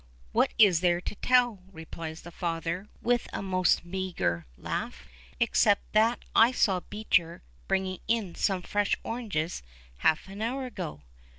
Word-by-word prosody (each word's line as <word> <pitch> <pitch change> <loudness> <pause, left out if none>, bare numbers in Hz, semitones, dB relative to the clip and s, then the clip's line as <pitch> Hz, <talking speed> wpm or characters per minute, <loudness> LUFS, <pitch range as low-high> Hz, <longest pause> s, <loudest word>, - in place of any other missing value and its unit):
"What - - +2
is 195 -7 +6
there 175 -1 +2
to 180 - -5
tell?" 245 -1 +3
replies 160 -1 -8
his 175 - -10
father 170 +2 -3 0.2
with 240 0 +1
a - - -4
most 185 -2 +2
meagre 175 - -2
laugh, - - -4 0.3
"except 205 -1 +2
that 225 +3 +3
I 230 +2 +7
saw 195 -7 +2
Beecher 180 -4 -1 0.2
bringing 190 -1 0
in 220 -6 0
some 190 -3 0
fresh 205 +1 +1
oranges 200 -9 -3 0.4
half 155 - +2
an 195 +2 -8
hour 255 +4 -2
ago. 75 - -6
190 Hz, 140 wpm, -28 LUFS, 170-220 Hz, 0.4 s, I